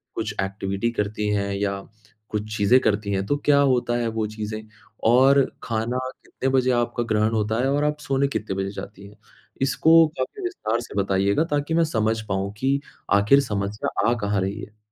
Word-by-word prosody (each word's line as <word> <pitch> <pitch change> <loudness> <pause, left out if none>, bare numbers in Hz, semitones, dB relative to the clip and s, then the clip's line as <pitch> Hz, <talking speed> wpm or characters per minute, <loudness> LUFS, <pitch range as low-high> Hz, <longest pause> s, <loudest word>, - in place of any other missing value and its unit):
कुछ 110 -2 -3
एक्टिविटी 100 +3 -2
करती 105 -1 -2
हैं 100 -1 -1
या 100 0 -1 0.5
कुछ 110 0 -4
चीज़ें 105 +6 +5
करती 100 -1 0
हैं, 95 0 -1
तो 145 - +1
क्या 145 -1 +5
होता 125 -3 +2
है 120 -1 -1
वो 110 -1 -1
चीज़ें? 110 0 -5 0.5
और 135 +4 +6 0.2
खाना 115 +2 -2 0.3
कितने 135 - -3
बजे 130 -1 +2
आपका 120 0 0
ग्रहण 110 +1 +2
होता 110 +1 0
है 135 - +1
और 145 +1 +1
आप 150 0 0
सोने 140 -1 0
कितने 110 -7 -3
बजे 95 0 -2
जाती 100 -1 -9
हैं? 105 - -17 0.4
इसको 160 +4 +5
काफ़ी 130 - -4
विस्तार 120 - -2
से 120 - -10
बताइएगा 100 +8 +1
ताकि 145 +2 0
मैं 165 0 +4
समझ 110 -5 0
पाऊँ 100 0 -2
कि 135 +3 +1 0.3
आख़िर 105 +8 +5
समस्या 105 -1 -1
आ - - +3
कहाँ 100 -1 +1
रही 100 +3 -3
है? 105 +2 -11
110 Hz, 185 wpm, -23 LUFS, 100-130 Hz, 0.5 s, और